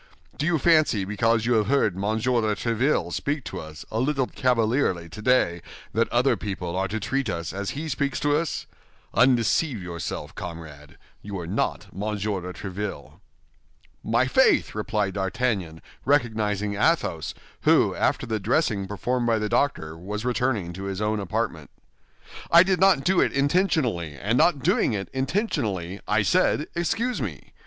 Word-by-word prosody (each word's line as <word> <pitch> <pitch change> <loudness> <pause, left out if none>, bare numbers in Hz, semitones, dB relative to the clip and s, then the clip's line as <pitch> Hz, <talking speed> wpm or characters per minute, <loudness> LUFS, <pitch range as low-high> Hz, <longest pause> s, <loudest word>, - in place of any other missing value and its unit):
Do 150 - -2
you 175 -1 +3
fancy 155 - +3
because 110 +2 +1
you 120 - +2
have 110 -3 +2
heard 115 -8 +2
Monsieur 110 +5 0
de 105 -1 0
Tréville 120 +7 0
speak 145 -1 -2
to - - -6
us 80 0 -9
a 110 - -1
little 135 +1 +1
cavalierly 115 -8 +1
today 90 -2 +1 0.3
that 115 +2 +1
other 125 +3 +3
people 95 -4 -4
are 95 +1 0
to 110 +2 -3
treat 130 +7 -1
us 85 0 -3
as 100 +6 -4
he 160 +2 -4
speaks 140 -2 -1
to 145 0 +2
us? 160 0 -2 0.5
Undeceive 125 +2 +3
yourself, 85 -3 -5
comrade, 80 -5 -9 0.2
you 100 -1 -6
are 85 - -5
not 85 - -1
Monsieur 105 0 -2
de 90 +1 -6
Tréville." 100 +3 -6 0.8
"My 120 +3 +2
faith!" 260 - +3
replied 105 -2 -1
D'Artagnan, 95 -4 -2 0.2
recognizing 110 -7 +1
Athos, 105 - 0 0.3
who, - - +4
after - - 0
the 110 -2 -2
dressing 100 - 0
performed 120 +5 -1
by 115 -1 +3
the 105 -1 -2
doctor, 80 - 0
was 105 +7 -5
returning 120 -8 0
to 95 +2 -6
his 95 -1 -4
own 105 0 0
apartment. 100 -3 -3 0.8
"I 170 +1 +8
did 190 0 +1
not 190 -7 +5
do 185 -1 +3
it - - +1
intentionally, 140 - +1
and 105 - -1
not 140 0 +3
doing - - +2
it 100 -2 -3
intentionally, 130 - -1
I 105 0 +2
said 175 - +2
'Excuse 230 +9 -1
me. - - -6
110 Hz, 160 wpm, -25 LUFS, 95-135 Hz, 0.8 s, I